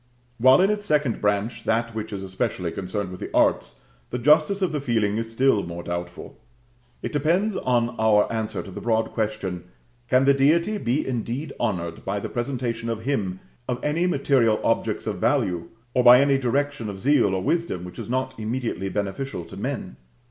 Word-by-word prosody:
While 130 +6 +6
in 195 +2 +4
its 205 -1 -3
second 145 -5 +1
branch, 105 +3 0
that 115 +1 0
which 110 -1 -5
is 100 -2 -5
especially 95 -2 -2
concerned 95 +1 -4
with 90 - -8
the - - -5
arts, - - +1 0.3
the 125 - -3
justice 155 +9 +3
of 185 - +1
the 150 -2 -2
feeling 110 -5 0
is 115 0 -3
still 115 -2 +3
more 85 -1 -6
doubtful; 85 0 -6 0.6
it - - -3
depends 175 +8 +1
on 120 -2 +1
our 110 -2 +4
answer 110 -2 -3
to 95 - -10
the - - -7
broad 115 -1 0
question, 105 -5 -3 0.4
Can 130 +2 +3
the 140 - +6
Deity 170 +9 +2
be 125 +1 0
indeed 125 +4 -3
honored 85 -7 -2
by 100 +1 -2
the - - -5
presentation 120 -2 -3
to 115 - 0
Him 110 -6 -2 0.3
of 125 - 0
any 160 +4 +1
material 135 -8 +2
objects - - 0
of - - -3
value, 85 -2 +1 0.3
or 125 - +3
by 125 0 +9
any 140 -1 +3
direction 135 -2 -1
of 95 -1 -7
zeal 115 -5 +3
or 95 - -2
wisdom 165 - -1
which 90 0 -9
is - - -6
not 130 +1 -1
immediately 110 -4 -3
beneficial 100 +1 -3
to - - -11
men? 65 - -4
115 Hz, 185 wpm, -24 LUFS, 100-135 Hz, 0.6 s, by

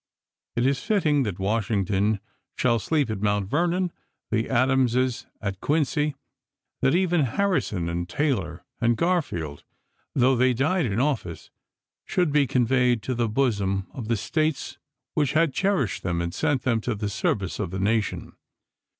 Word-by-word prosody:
It 120 +1 +1
is 135 0 +1
fitting 155 -9 +2
that 90 - -6
Washington 100 0 0 0.4
shall 120 -2 +2
sleep 145 0 0
at 105 -3 -4
Mount 105 -2 +1
Vernon, 175 - +1 0.4
the 110 +1 0
Adamses 130 0 +2
at 100 -2 -4
Quincy, 150 0 +1 0.7
that 135 - +3
even 175 -2 +2
Harri 185 - +1
son 90 -5 -3
and 85 +1 -3
Taylor 95 - -1
and 120 -1 +2
Garfield, 115 - -1 0.5
though 130 0 +4
they 125 0 +3
died 155 +4 +1
in 105 +1 -1
office, 125 - -2 0.5
should 175 -4 0
be 145 -1 +3
conveyed 125 -1 +2
to 130 - -2
the 120 -2 0
bosom 100 -6 0
of 120 -5 -6
the 115 0 +1
States 155 +7 -1 0.3
which 145 -3 +1
had 160 -2 +3
cherished 190 - 0
them 85 -2 -1
and 85 0 -2
sent 145 -3 0
them 115 -3 +1
to 120 0 -2
the 105 0 -3
service 100 -3 -1
of 100 -4 -2
the 95 +2 -4
nation. 105 +2 -1
120 Hz, 155 wpm, -25 LUFS, 100-145 Hz, 0.7 s, though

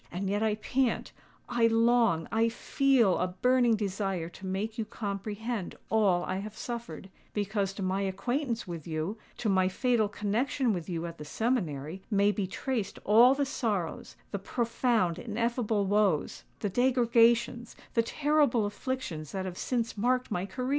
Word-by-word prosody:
And 190 +2 -2
yet 205 +1 0
I 220 -1 +2
pant—I 240 0 -1
long—I 230 -2 +3
feel 245 -4 +2
a 180 - +1
burning 245 +5 +3
desire 195 -4 -2
to 190 +2 -9
make 210 +4 -3
you - - +1
comprehend 210 0 -4 0.2
all 200 -5 +3
I 185 - -2
have 210 +2 -6
suffered;—because 205 -3 -4
to 195 - -5
my 190 +1 0
acquaintance 235 +5 -2
with 170 -3 -6
you—to 170 +8 -4
my 190 -2 +3
fatal 225 +2 +1
connexion 225 +4 0
with 175 -1 -5
you 170 -1 -2
at 170 0 -7
the 150 - -7
seminary—may 195 - 0
be 205 -2 -2
traced 225 0 -3
all 235 +6 +6
the 285 0 +1
sorrows—the 205 - -3
profound, 230 -4 0
ineffable 230 -1 0
woes—the 200 0 0
degradations—the 235 0 +2
terrible 285 -3 +2
afflictions 205 - -4
that 190 -1 -2
have 185 -2 -5
since 235 -3 -1
marked 250 +2 +1
my 185 -1 -1
career!" 255 +4 -4
215 Hz, 135 wpm, -29 LUFS, 190-240 Hz, 0.2 s, all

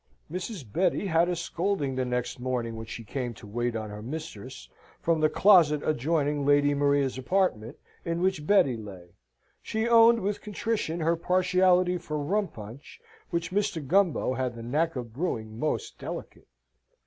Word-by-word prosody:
Mrs. 180 - -5
Betty 180 +2 +1
had 170 -1 +2
a 180 - 0
scolding 170 -4 -2
the 130 0 0
next 125 0 -2
morning, 125 -2 -2
when 110 0 -7
she 115 - -7
came 120 +1 -4
to 110 - -13
wait 120 +3 -2
on 110 -1 -4
her 105 0 -7
mistress, 115 - -7 0.3
from 165 -1 +1
the 155 - +4
closet 160 -5 +5
adjoining 150 0 0
Lady 145 0 +4
Maria's 140 -2 +1
apartment, 130 - 0 0.3
in 170 0 -2
which 180 -4 0
Betty 165 -11 +4
lay. 95 -5 -10 0.5
She 220 +1 -2
owned, 230 0 +6
with 200 +1 -2
contrition, 210 -5 -2
her 165 +2 +2
partiality 180 +1 +2
for 155 -3 -4
rum 195 +8 0
punch, 120 - -11 0.3
which 170 0 -2
Mr. 185 -6 -1
Gumbo 175 -6 +2
had 130 -2 -2
the 115 - -8
knack 155 +7 0
of 120 -3 -6
brewing 110 -7 -3
most 155 - -2
delicate. - - -7
150 Hz, 160 wpm, -27 LUFS, 125-180 Hz, 0.5 s, owned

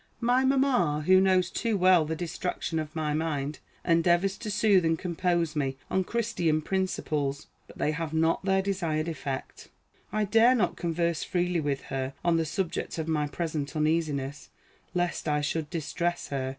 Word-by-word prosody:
My 245 +2 +3
mamma, 260 - +2
who 185 +1 +6
knows 185 -2 +3
too 225 -3 0
well 180 -3 +5
the 160 +1 -2
distraction 170 0 -3
of 155 0 -6
my 155 -2 -1
mind, 150 -2 -2 0.3
endeavors 175 +3 +3
to 220 - -5
soothe 200 -2 +4
and 160 0 +2
compose 170 -2 -1
me 135 -3 -1
on 190 -1 +1
Christian 210 -10 0
principles; 150 -6 -1 0.2
but - - -15
they 150 - +1
have 160 0 -3
not 160 +2 +1
their 190 0 +2
desired 170 -5 -1
effect. 140 -5 -5 0.4
I 215 0 +1
dare 225 +5 +5
not 195 -8 +1
converse 170 -1 -1
freely 175 -1 0
with 145 -3 -1
her 135 0 -2
on 170 -1 +4
the 165 - +1
subject 170 +3 -3
of 160 -1 -3
my 150 -2 0
present 150 -2 -3
uneasiness, 150 -3 -1 0.5
lest 175 -2 -1
I 150 -1 +1
should 150 +1 -2
distress 170 +2 -2
her. 135 -2 -2
165 Hz, 165 wpm, -28 LUFS, 150-185 Hz, 0.5 s, who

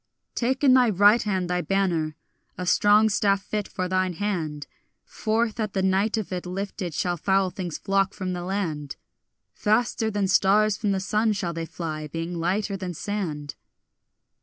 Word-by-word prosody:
Take 260 +3 -1
in 265 -3 +6
thy 250 -2 +5
right 205 +3 +5
hand 190 -4 -1
thy 180 0 0
banner, 175 -6 0 0.4
a 180 - -4
strong 205 +4 +5
staff 200 -1 +1
fit 210 0 -3
for 185 - -3
thine 185 0 0
hand; 160 -6 -3 0.4
Forth 225 0 -1
at 215 -2 -2
the 190 - 0
light 195 +4 +2
of 215 -3 -4
it 180 0 -4
lifted 185 -2 -4
shall 175 -1 -1
foul 190 +2 +1
things 175 -4 -5
flock 195 0 0
from 185 -1 -3
the 175 - -4
land; 170 -7 -3 0.6
Faster 220 +1 +1
than 205 -2 0
stars 205 +2 +4
from 205 -1 -1
the 195 - 0
sun 215 +3 +1
shall 180 -4 -3
they 165 0 -4
fly, 155 -3 -5
being 165 +3 -4
lighter 195 +4 -1
than 185 -2 -5
sand. 155 -8 -4
195 Hz, 170 wpm, -25 LUFS, 175-210 Hz, 0.6 s, in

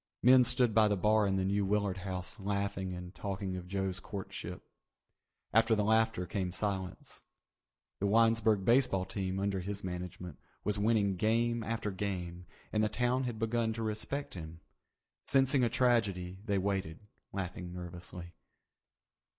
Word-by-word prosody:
Men 125 +1 +8
stood 120 -1 +3
by 110 0 +5
the 105 -1 +1
bar 105 +2 +3
in 95 - +1
the 95 0 +1
New 100 +1 +1
Willard 100 -1 0
House 95 +2 -5
laughing 100 -1 -2
and 90 0 -7
talking 95 -2 -4
of 90 -1 -6
Joe's 95 -1 -2
courtship. 95 +1 -6 0.9
After 115 +1 +5
the 105 - +1
laughter 110 -3 +2
came 90 +1 -2
the 90 - -4
silence. 95 -3 -3 0.8
The 100 - +1
Winesburg 115 -2 +3
baseball 120 -6 +3
team, 95 -1 -3
under 100 -1 0
his 100 +2 -4
management, 90 -3 -6 0.2
was 105 0 0
winning 100 -3 +2
game 115 +3 +1
after 110 -1 -2
game, 90 -3 -4 0.3
and 110 0 +2
the 110 - +2
town 125 +3 +1
had 120 -3 -3
begun 115 0 0
to 115 0 -4
respect 110 +6 -3
him. 80 -2 -8 0.7
Sensing 135 -1 +3
a 120 - +3
tragedy, 105 -7 +1
they 100 -3 +1
waited, 95 -4 -2 0.3
laughing 90 -2 -5
nervously. 90 0 -7
100 Hz, 150 wpm, -32 LUFS, 95-110 Hz, 0.9 s, Men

